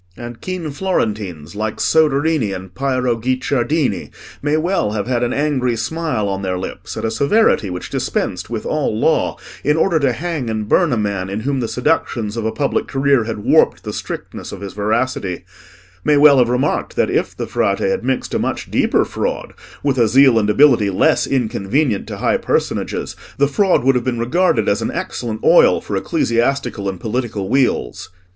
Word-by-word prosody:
And 120 Hz, -1 st, -8 dB
keen 180 Hz, -5 st, -4 dB
Florentines 105 Hz, -, -3 dB
like 110 Hz, +1 st, -3 dB
Soderini 150 Hz, -7 st, +2 dB
and 95 Hz, -1 st, -8 dB
Piero 130 Hz, 0 st, 0 dB
Guicciardini 130 Hz, -, -1 dB, 0.3 s
may 150 Hz, +2 st, +1 dB
well 165 Hz, -, 0 dB
have 105 Hz, -2 st, -2 dB
had 120 Hz, -1 st, 0 dB
an 120 Hz, 0 st, 0 dB
angry 135 Hz, -4 st, 0 dB
smile 135 Hz, -2 st, -2 dB
on 95 Hz, -1 st, -2 dB
their 95 Hz, -1 st, -2 dB
lips 90 Hz, -, -7 dB
at -, -, -3 dB
a 110 Hz, -, 0 dB
severity 140 Hz, -, +2 dB
which 90 Hz, 0 st, -6 dB
dispensed 90 Hz, +2 st, -2 dB
with 115 Hz, -2 st, -4 dB
all 140 Hz, -8 st, -1 dB
law 160 Hz, -, +1 dB, 0.3 s
in 150 Hz, +2 st, +2 dB
order 165 Hz, 0 st, +2 dB
to 140 Hz, -3 st, +2 dB
hang 150 Hz, -1 st, -3 dB
and 110 Hz, -1 st, -3 dB
burn 170 Hz, +6 st, +3 dB
a 120 Hz, -, +1 dB
man 100 Hz, -3 st, -2 dB
in 100 Hz, +3 st, -3 dB
whom 135 Hz, +2 st, -1 dB
the 120 Hz, -, -1 dB
seductions 115 Hz, -4 st, -1 dB
of 115 Hz, -2 st, -3 dB
a -, -, -1 dB
public 140 Hz, +2 st, -1 dB
career 135 Hz, -3 st, +2 dB
had 110 Hz, -2 st, -5 dB
warped -, -, +3 dB
the -, -, -5 dB
strictness -, -, -6 dB
of -, -, -8 dB
his 100 Hz, -1 st, -6 dB
veracity; 105 Hz, -3 st, -1 dB, 0.6 s
may 150 Hz, -, +3 dB
well 145 Hz, -2 st, +7 dB
have 120 Hz, -1 st, +3 dB
remarked 125 Hz, +4 st, -1 dB
that -, -, +1 dB
if -, -, -1 dB
the -, -, -3 dB
Frate -, -, 0 dB
had 485 Hz, 0 st, -1 dB
mixed -, -, -2 dB
a -, -, +1 dB
much -, -, -3 dB
deeper -, -, +2 dB
fraud -, -, -3 dB, 0.3 s
with 135 Hz, -3 st, +1 dB
a 115 Hz, -, +4 dB
zeal 130 Hz, 0 st, +5 dB
and 105 Hz, -1 st, 0 dB
ability 120 Hz, -3 st, +4 dB
less 95 Hz, -, +2 dB
inconvenient 120 Hz, -1 st, 0 dB
to -, -, -6 dB
high -, -, +1 dB
personages, -, -, -2 dB, 0.2 s
the 140 Hz, -, +3 dB
fraud 185 Hz, -, +2 dB
would 135 Hz, +1 st, +4 dB
have 125 Hz, -2 st, 0 dB
been 125 Hz, -1 st, -1 dB
regarded 120 Hz, -, +1 dB
as 100 Hz, -, +1 dB
an -, -, -1 dB
excellent 110 Hz, -3 st, -4 dB
oil -, -, +5 dB
for -, -, -5 dB
ecclesiastical 115 Hz, -3 st, 0 dB
and 95 Hz, -2 st, -6 dB
political 110 Hz, -2 st, -3 dB
wheels. 125 Hz, -, 0 dB
120 Hz, 185 wpm, -18 LUFS, 105-140 Hz, 0.6 s, well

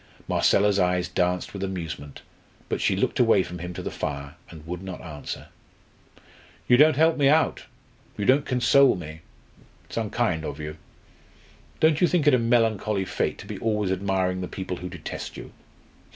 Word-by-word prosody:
Marcella's 100 Hz, 0 st, +3 dB
eyes 90 Hz, -1 st, +1 dB
danced 90 Hz, +1 st, -1 dB
with 100 Hz, -1 st, -5 dB
amusement, 80 Hz, -7 st, -6 dB, 0.5 s
but -, -, -2 dB
she -, -, +2 dB
looked -, -, -1 dB
away 115 Hz, -6 st, +5 dB
from 90 Hz, 0 st, -8 dB
him 90 Hz, +1 st, -5 dB
to -, -, -6 dB
the -, -, -4 dB
fire, 70 Hz, -1 st, -4 dB, 0.2 s
and 80 Hz, -2 st, -12 dB
would 90 Hz, +1 st, -5 dB
not 95 Hz, -1 st, -7 dB
answer. 75 Hz, -4 st, -8 dB, 1.2 s
"You 125 Hz, -, +6 dB
don't 150 Hz, +3 st, +6 dB
help 160 Hz, +3 st, +3 dB
me 140 Hz, -2 st, +4 dB
out. 155 Hz, +3 st, +2 dB, 0.5 s
You 105 Hz, -, -2 dB
don't 135 Hz, +5 st, +4 dB
console 130 Hz, +2 st, +4 dB
me. 80 Hz, -2 st, -8 dB, 0.6 s
It's -, -, -9 dB
unkind 110 Hz, -6 st, 0 dB
of 75 Hz, -1 st, -5 dB
you. 75 Hz, 0 st, -6 dB, 1.0 s
Don't 160 Hz, 0 st, +3 dB
you 180 Hz, -, +6 dB
think 175 Hz, -4 st, +1 dB
it 150 Hz, -, +5 dB
a 125 Hz, -, +5 dB
melancholy 110 Hz, -4 st, +1 dB
fate -, -, -2 dB
to -, -, -10 dB
be -, -, -7 dB
always 105 Hz, -4 st, 0 dB
admiring 95 Hz, -1 st, 0 dB
the 90 Hz, -, -3 dB
people 95 Hz, -1 st, -5 dB
who 90 Hz, -, -6 dB
detest 85 Hz, -3 st, -7 dB
you?" -, -, -9 dB
95 Hz, 175 wpm, -25 LUFS, 90-120 Hz, 1.2 s, You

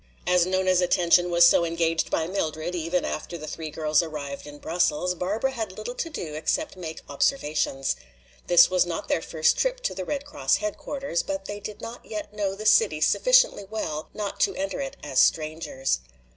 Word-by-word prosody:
As 180 Hz, -1 st, +3 dB
Nona's 185 Hz, -1 st, +2 dB
attention 175 Hz, 0 st, +3 dB
was 170 Hz, 0 st, +6 dB
so 170 Hz, -, +5 dB
engaged 165 Hz, -1 st, 0 dB
by 160 Hz, -, 0 dB
Mildred, 165 Hz, -2 st, -3 dB
even 175 Hz, 0 st, -1 dB
after 170 Hz, +3 st, -4 dB
the 155 Hz, -, -8 dB
three 160 Hz, 0 st, -6 dB
girls 155 Hz, +1 st, +2 dB
arrived 145 Hz, -3 st, -6 dB
in 145 Hz, 0 st, -10 dB
Brussels, 175 Hz, +2 st, 0 dB
Barbara 205 Hz, +9 st, -1 dB
had 220 Hz, -7 st, -5 dB
little 215 Hz, +3 st, -5 dB
to 330 Hz, -, -4 dB
do 170 Hz, -, -6 dB
except 280 Hz, -, -1 dB
make 160 Hz, -4 st, -7 dB
observations. 145 Hz, -, 0 dB, 0.5 s
This 175 Hz, -1 st, +7 dB
was 185 Hz, -1 st, +3 dB
not 175 Hz, -2 st, -5 dB
their -, -, +1 dB
first 160 Hz, -1 st, +1 dB
trip -, -, +1 dB
to -, -, -1 dB
the 185 Hz, 0 st, -4 dB
Red 285 Hz, +8 st, -3 dB
Cross 140 Hz, -, +1 dB
headquarters, 210 Hz, 0 st, -3 dB
but 195 Hz, 0 st, -4 dB
they 205 Hz, +1 st, -5 dB
did 205 Hz, 0 st, -8 dB
not 235 Hz, +1 st, -8 dB
yet 210 Hz, -1 st, -6 dB
know 200 Hz, -2 st, -2 dB
the 215 Hz, +2 st, -8 dB
city 450 Hz, -, +4 dB
sufficiently -, -, +4 dB
well 160 Hz, -8 st, -4 dB
not 205 Hz, -2 st, -5 dB
to 395 Hz, -, +2 dB
enter 290 Hz, 0 st, -3 dB
it 275 Hz, 0 st, -5 dB
as 135 Hz, -3 st, 0 dB
strangers. 155 Hz, -, +1 dB
180 Hz, 185 wpm, -25 LUFS, 160-210 Hz, 0.5 s, This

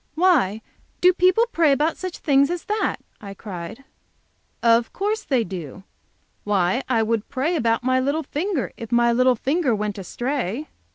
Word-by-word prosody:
"Why, 300 Hz, -, +2 dB, 0.4 s
do 365 Hz, +1 st, +5 dB
people 370 Hz, +5 st, +3 dB
pray 325 Hz, -3 st, +3 dB
about 300 Hz, +4 st, +1 dB
such 370 Hz, -2 st, -6 dB
things 280 Hz, -1 st, +3 dB
as 350 Hz, -1 st, -3 dB
that?" 425 Hz, +1 st, 0 dB, 0.3 s
I 200 Hz, -2 st, -8 dB
cried. 190 Hz, +4 st, -8 dB, 0.8 s
"Of 230 Hz, 0 st, +3 dB
course 420 Hz, +3 st, -1 dB
they 260 Hz, -6 st, +1 dB
do. 180 Hz, -2 st, -8 dB, 0.6 s
Why, 200 Hz, +3 st, +1 dB
I 230 Hz, -3 st, +2 dB
would 225 Hz, -1 st, -1 dB
pray 290 Hz, +6 st, -1 dB
about 230 Hz, -5 st, +1 dB
my 255 Hz, +1 st, +2 dB
little 285 Hz, +5 st, -1 dB
finger, 315 Hz, -, -2 dB
if 230 Hz, 0 st, -8 dB
my 235 Hz, 0 st, +3 dB
little 255 Hz, +1 st, +3 dB
finger 275 Hz, +1 st, 0 dB
went 210 Hz, -1 st, -3 dB
astray." 245 Hz, -, -3 dB
255 Hz, 160 wpm, -22 LUFS, 220-320 Hz, 0.8 s, do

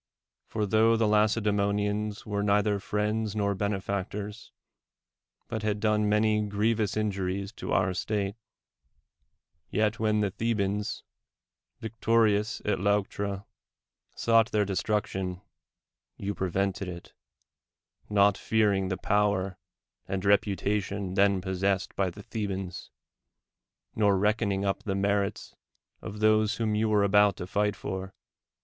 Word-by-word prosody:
For, 105 Hz, -1 st, -1 dB
tho 110 Hz, +2 st, +4 dB
the 110 Hz, -, +2 dB
Lacedeemonians 105 Hz, -1 st, +1 dB
were 105 Hz, -1 st, -2 dB
neither 105 Hz, 0 st, +2 dB
friends 105 Hz, +1 st, -1 dB
nor 100 Hz, -1 st, +1 dB
benefactors, 100 Hz, +2 st, -3 dB, 1.0 s
but 110 Hz, -, -4 dB
had 105 Hz, -1 st, -1 dB
done 105 Hz, 0 st, +2 dB
many 105 Hz, 0 st, +3 dB
grievous 105 Hz, +1 st, 0 dB
injuries 100 Hz, -2 st, -2 dB
to -, -, -5 dB
our 95 Hz, -1 st, +2 dB
state, 100 Hz, +1 st, -2 dB, 1.3 s
yet 110 Hz, 0 st, 0 dB
when 105 Hz, -1 st, +2 dB
the 100 Hz, -2 st, 0 dB
Thebans, 105 Hz, -1 st, -1 dB, 0.8 s
victorious 110 Hz, -1 st, +1 dB
at 105 Hz, -, 0 dB
Leuctra, 100 Hz, 0 st, -1 dB, 0.7 s
sought 115 Hz, -1 st, +3 dB
their 105 Hz, -1 st, +2 dB
destruction, 95 Hz, -2 st, -2 dB, 0.8 s
you 100 Hz, +1 st, -3 dB
prevented 95 Hz, +1 st, -1 dB
it, 85 Hz, -1 st, -9 dB, 1.0 s
not 100 Hz, -1 st, +4 dB
fearing 105 Hz, -4 st, +2 dB
the 95 Hz, -1 st, -2 dB
power 100 Hz, -2 st, 0 dB, 0.5 s
and 95 Hz, 0 st, -3 dB
reputation 100 Hz, -1 st, +1 dB
then 100 Hz, -1 st, +3 dB
possessed 95 Hz, +1 st, -1 dB
by 95 Hz, -1 st, +1 dB
the 100 Hz, +3 st, -11 dB
The 110 Hz, -3 st, -3 dB
bans, 95 Hz, -2 st, -5 dB, 1.1 s
nor 100 Hz, -2 st, +3 dB
reckoning 105 Hz, -1 st, +1 dB
np 100 Hz, -1 st, -1 dB
the 100 Hz, -2 st, -2 dB
merits 100 Hz, +1 st, -1 dB, 0.5 s
of 105 Hz, +1 st, -7 dB
those 110 Hz, +1 st, +3 dB
whom 110 Hz, -2 st, -1 dB
you 110 Hz, +1 st, +1 dB
were 105 Hz, -1 st, +3 dB
about 105 Hz, 0 st, +4 dB
to -, -, -5 dB
fight 105 Hz, +2 st, 0 dB
for. 95 Hz, 0 st, -6 dB
105 Hz, 120 wpm, -28 LUFS, 100-105 Hz, 1.3 s, tho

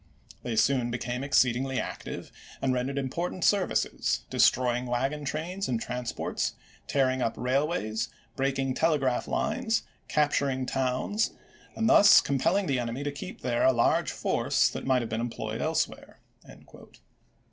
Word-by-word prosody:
They 120 Hz, -2 st, -3 dB
soon 125 Hz, +1 st, +2 dB
be 120 Hz, -, -2 dB
came 125 Hz, +1 st, -4 dB
exceedingly 130 Hz, -1 st, +2 dB
active, -, -, -6 dB, 0.3 s
and 130 Hz, -, +1 dB
rendered 130 Hz, +2 st, -2 dB
important 170 Hz, +7 st, -3 dB
services, 70 Hz, -, +1 dB
destroying 125 Hz, 0 st, +3 dB
wagon 135 Hz, +5 st, -1 dB
trains 175 Hz, +7 st, -3 dB
and 120 Hz, -3 st, 0 dB
transports, 125 Hz, 0 st, -3 dB, 0.3 s
tearing 130 Hz, -2 st, +1 dB
up 115 Hz, -2 st, 0 dB
railways, 130 Hz, -4 st, -1 dB, 0.3 s
breaking 135 Hz, -1 st, 0 dB
telegraph 140 Hz, -4 st, +1 dB
lines, 225 Hz, -4 st, 0 dB, 0.2 s
cap 150 Hz, -1 st, +2 dB
^^^^^> -, -, -6 dB
turing 130 Hz, -2 st, 0 dB
towns, 130 Hz, -, -1 dB, 0.4 s
and 225 Hz, -, 0 dB
thus 205 Hz, -2 st, +8 dB
compelling 170 Hz, +9 st, +1 dB
the 135 Hz, -5 st, 0 dB
enemy 120 Hz, +3 st, -3 dB
to 145 Hz, -, -2 dB
i863!"w\. -, -, -15 dB, 0.2 s
keep -, -, -22 dB
there 120 Hz, -1 st, 0 dB
a 130 Hz, -, +6 dB
large 120 Hz, -2 st, +2 dB
force -, -, +1 dB
that -, -, -6 dB
might 130 Hz, -2 st, +3 dB
have 115 Hz, -, -5 dB
been 110 Hz, +1 st, -2 dB
em 120 Hz, -, -2 dB
^"p.fa"^" -, -, -12 dB
ployed -, -, -4 dB
elsewhere." -, -, -2 dB
130 Hz, 155 wpm, -28 LUFS, 125-145 Hz, 0.4 s, thus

